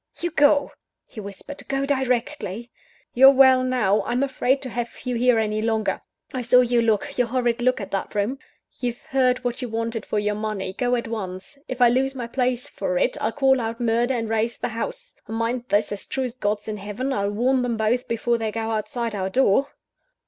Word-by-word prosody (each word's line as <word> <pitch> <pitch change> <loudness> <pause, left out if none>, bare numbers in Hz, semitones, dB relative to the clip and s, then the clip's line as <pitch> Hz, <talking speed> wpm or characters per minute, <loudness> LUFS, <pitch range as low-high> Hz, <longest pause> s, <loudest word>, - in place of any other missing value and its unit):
"You 345 0 -2
go," 290 -2 +4 0.3
he 225 - -11
whispered, 200 +8 -8
"go 275 0 -1
directly! 250 -4 -2 0.4
You're 265 +2 +8
well 260 -1 +6
now 230 -6 +2
I'm 245 +3 -1
afraid 265 0 +1
to 260 - -4
have 240 0 -3
you 250 - -2
here 245 0 +3
any 215 -1 0
longer. 220 -3 0 0.3
I 255 - -2
saw 250 +1 +5
your 240 -1 +2
look, 230 +5 0
your 245 - +3
horrid 240 -1 0
look 255 0 +2
at 200 - -6
that 195 - -3
room! 215 +7 -1 0.4
You've 245 -2 -3
heard 255 -1 +1
what 245 +1 -2
you 250 - -4
wanted 225 0 -3
for - - -1
your 210 0 +1
money 210 -3 -3
go 245 +4 0
at 235 -1 -3
once; 195 +3 -6
or, - - -31
if 255 0 -5
I 240 - +7
lose 265 +2 +1
my 245 -2 -4
place 250 0 -1
for - - -2
it, - - +1
I'll - - 0
call 265 -3 +3
out 230 +1 -4
Murder, 240 +2 +1
and 225 -2 -2
raise 225 +1 0
the - - -3
house. - - -5
And 225 - -4
mind 235 +2 -1
this: 205 +1 +2
as 205 - -5
true 265 - -2
as 250 -2 -3
God's 210 -4 -2
in 215 -1 -3
heaven, 210 +7 -3
I'll 200 -3 0
warn 250 +5 +1
them 240 -2 -1
both 225 +3 0
before 230 0 0
they 220 -1 -2
go 225 +1 -3
outside 225 +1 -2
our 190 -2 -2
door!" 265 +3 +3
240 Hz, 215 wpm, -23 LUFS, 220-255 Hz, 0.4 s, You're